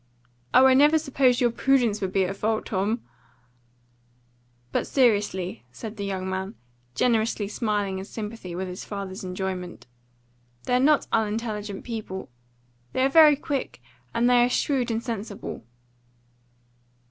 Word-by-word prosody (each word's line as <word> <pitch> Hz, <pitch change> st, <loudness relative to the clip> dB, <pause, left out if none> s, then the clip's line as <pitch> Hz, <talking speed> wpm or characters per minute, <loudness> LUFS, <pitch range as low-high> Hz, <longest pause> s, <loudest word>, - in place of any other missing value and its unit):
"Oh, 260 Hz, -, +7 dB
I 265 Hz, -, +7 dB
never 295 Hz, +4 st, +6 dB
supposed 270 Hz, -4 st, +2 dB
your 240 Hz, -1 st, +3 dB
PRUDENCE 240 Hz, -4 st, +2 dB
would 190 Hz, -1 st, -2 dB
be 190 Hz, -1 st, +2 dB
at 195 Hz, +2 st, -4 dB
fault, 215 Hz, +2 st, -1 dB
Tom!" 210 Hz, +4 st, -1 dB, 1.7 s
"But -, -, -1 dB
seriously," 205 Hz, -, +1 dB
said 220 Hz, -, -8 dB
the 200 Hz, -, -4 dB
young 190 Hz, -1 st, -3 dB
man, 190 Hz, +3 st, -4 dB, 0.4 s
generously 225 Hz, -4 st, +1 dB
smiling 205 Hz, -3 st, -1 dB
in 190 Hz, -, -6 dB
sympathy 210 Hz, -4 st, -7 dB
with 190 Hz, +1 st, -3 dB
his 180 Hz, 0 st, -7 dB
father's 195 Hz, -2 st, -6 dB
enjoyment, 185 Hz, -1 st, -5 dB, 0.8 s
"they're 250 Hz, -, +2 dB
not 290 Hz, +3 st, +4 dB
unintelligent 215 Hz, -2 st, -2 dB
people. 215 Hz, -, -6 dB, 0.6 s
They 260 Hz, -, +1 dB
are -, -, +3 dB
very 305 Hz, 0 st, +7 dB
quick, 280 Hz, -, -4 dB, 0.3 s
and 235 Hz, -, +2 dB
they 245 Hz, -1 st, +5 dB
are 245 Hz, -, +2 dB
shrewd 255 Hz, -1 st, 0 dB
and 225 Hz, 0 st, -2 dB
sensible." 215 Hz, -, -5 dB
215 Hz, 135 wpm, -25 LUFS, 190-250 Hz, 1.7 s, Oh